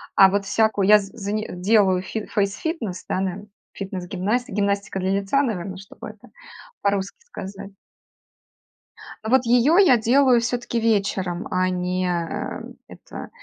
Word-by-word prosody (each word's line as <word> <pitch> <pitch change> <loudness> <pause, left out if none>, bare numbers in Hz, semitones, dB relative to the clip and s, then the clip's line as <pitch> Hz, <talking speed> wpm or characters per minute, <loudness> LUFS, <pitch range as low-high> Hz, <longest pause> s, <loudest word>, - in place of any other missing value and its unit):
а 195 - +8
вот 200 +1 -1
всякую 205 -1 +1
я 210 0 +8
з 195 -1 -8
зани 210 +1 -3
делаю 190 0 +3
фи 215 +3 -5
фейсфитнес, 205 - -2
да, 185 - 0
нен, 195 +2 -4 0.2
фитнес 190 -2 -6
гимнасти 210 +7 -1
гимнастика 200 -1 -1
для 185 0 -1
лица, 200 +8 +1
наверное, 190 -7 -3
чтобы 195 +1 -10
это - - -15 0.5
по-русски 200 -1 -1
сказать. 200 - -8 1.5
Ну 220 - -3
вот 260 0 +4
её 250 +8 +4
я 360 -11 +6
делаю 245 +2 +4
всё-таки 240 0 -2
вечером, 200 -5 0
а 185 0 +2
не, 180 0 -1
э, 170 -2 -3 0.3
это - - -10
200 Hz, 145 wpm, -23 LUFS, 190-230 Hz, 1.5 s, а